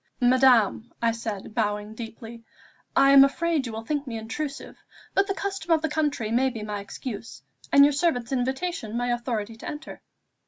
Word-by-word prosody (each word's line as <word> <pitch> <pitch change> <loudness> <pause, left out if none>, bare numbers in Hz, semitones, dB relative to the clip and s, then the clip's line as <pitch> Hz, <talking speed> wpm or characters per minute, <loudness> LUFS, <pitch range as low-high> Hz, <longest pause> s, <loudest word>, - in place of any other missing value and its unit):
"Madame," 245 -3 +4 0.2
said 220 -4 -5
I, - - -9
bowing 210 -1 -2
deeply, 230 0 -9 0.5
"I 275 0 +6
am 275 0 +9
afraid 300 0 +1
you - - -5
will 225 +1 -6
think 290 0 -2
me 230 -2 -4
intrusive, 275 +7 -5 0.4
but 390 0 +2
the 390 - -1
custom 390 -4 -4
of 320 -1 +3
the 315 - 0
country 295 -8 -1
may 260 +3 +3
be 225 -4 -6
my 210 -1 -4
excuse, 215 +2 -7 0.3
and 280 0 +8
your 290 - +3
servant's 275 -6 0
invitation 265 -2 -2
my 245 0 -1
authority 230 -3 -3
to - - -9
enter." 300 +1 -8
245 Hz, 180 wpm, -26 LUFS, 225-290 Hz, 0.5 s, am